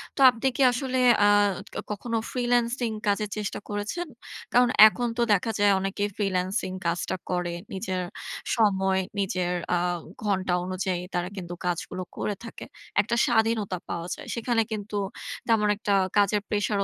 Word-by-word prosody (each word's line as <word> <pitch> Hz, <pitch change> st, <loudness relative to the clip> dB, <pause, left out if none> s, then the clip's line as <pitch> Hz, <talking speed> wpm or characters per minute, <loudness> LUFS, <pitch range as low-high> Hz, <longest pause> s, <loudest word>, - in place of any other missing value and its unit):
তো -, -, -9 dB
আপনি 245 Hz, +1 st, -1 dB
কি -, -, -1 dB
আসলে, 260 Hz, +1 st, -2 dB, 0.3 s
আ -, -, +6 dB, 0.6 s
কখনো 225 Hz, +3 st, -2 dB
freelancing 240 Hz, -1 st, +1 dB
কাজের 205 Hz, +1 st, +1 dB
চেষ্টা 210 Hz, -1 st, -3 dB
করেছেন? 210 Hz, +13 st, -3 dB, 0.5 s
কারণ 245 Hz, 0 st, +5 dB, 0.2 s
এখন 240 Hz, +3 st, -1 dB
তো -, -, +1 dB
দেখা 205 Hz, +3 st, +1 dB
যায় 205 Hz, 0 st, +5 dB
অনেকেই 195 Hz, +2 st, -1 dB
freelancing 185 Hz, -1 st, -1 dB
কাজটা 170 Hz, +2 st, -1 dB
করে। 180 Hz, -1 st, -1 dB, 0.2 s
নিজের 185 Hz, -1 st, -2 dB, 0.5 s
সময়, 190 Hz, -4 st, +2 dB, 0.2 s
নিজের, 180 Hz, -2 st, 0 dB, 0.2 s
আ -, -, +2 dB, 0.5 s
ঘণ্টা 190 Hz, -3 st, 0 dB
অনুযায়ী 185 Hz, -1 st, -2 dB
তারা 175 Hz, 0 st, -1 dB
কিন্তু 175 Hz, -2 st, -5 dB
কাজগুলো 180 Hz, +1 st, -2 dB
করে 205 Hz, -, -2 dB
থাকে। 230 Hz, -, -8 dB, 0.4 s
একটা 230 Hz, +3 st, -1 dB
স্বাধীনতা 220 Hz, -5 st, +1 dB
পাওয়া 170 Hz, 0 st, -3 dB
যায়। -, -, -11 dB
সেখানে 235 Hz, 0 st, +1 dB
কিন্তু 210 Hz, -1 st, -4 dB, 0.5 s
তেমন 220 Hz, -2 st, +3 dB
একটা 205 Hz, -1 st, -1 dB, 0.2 s
কাজের 205 Hz, 0 st, +3 dB
pressure 205 Hz, -1 st, 0 dB
205 Hz, 145 wpm, -26 LUFS, 185-230 Hz, 0.6 s, আ